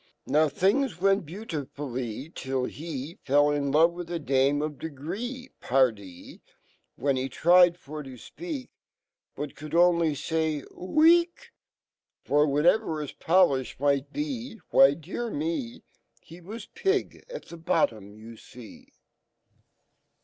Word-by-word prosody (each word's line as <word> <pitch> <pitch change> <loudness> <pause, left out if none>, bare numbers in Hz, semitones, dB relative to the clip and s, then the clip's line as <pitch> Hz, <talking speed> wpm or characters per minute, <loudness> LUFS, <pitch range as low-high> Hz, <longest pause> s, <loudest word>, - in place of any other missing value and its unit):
Now.fhings 180 - +1
went 195 -2 +2
beau 200 +8 -8
ti 155 -9 -3
ful 145 -2 -5
ly, 125 +4 -5
Till 130 -1 -3
he 150 +1 -7
Fell 145 +2 +3
in 140 -1 -1
love 160 +4 +5
with 175 -1 -7
a 175 - -2
dame 140 0 +1
of 150 -3 -5
degree; 200 - -6
Pardie 110 -9 -1 0.3
,' - - -40
"When 140 -1 0
he 130 +1 -2
tried 175 +4 +5
for 150 -2 -8
tofpe/ak, 255 - -8 0.7
But 145 -1 -6
could 155 +1 -7
only 170 -2 +4
fayrOw 160 - 0
e 340 +1 +8
e 340 - -8 1.0
kr* 150 +1 +3
whatever 160 +4 +2
hii - - -10
poii/h 160 -9 +2
might 140 0 +1
be, 265 -6 -5
Why, 135 +1 +6
dear 190 +10 -5
me! 295 -4 -4 0.4
He 170 +2 -14
was 215 +7 -8
pig 390 0 -2
at - - -8
the 170 - -9
bottom 110 - -1
,yu 115 +1 -12
fee. 120 -1 -14
160 Hz, 135 wpm, -27 LUFS, 140-195 Hz, 1.0 s, e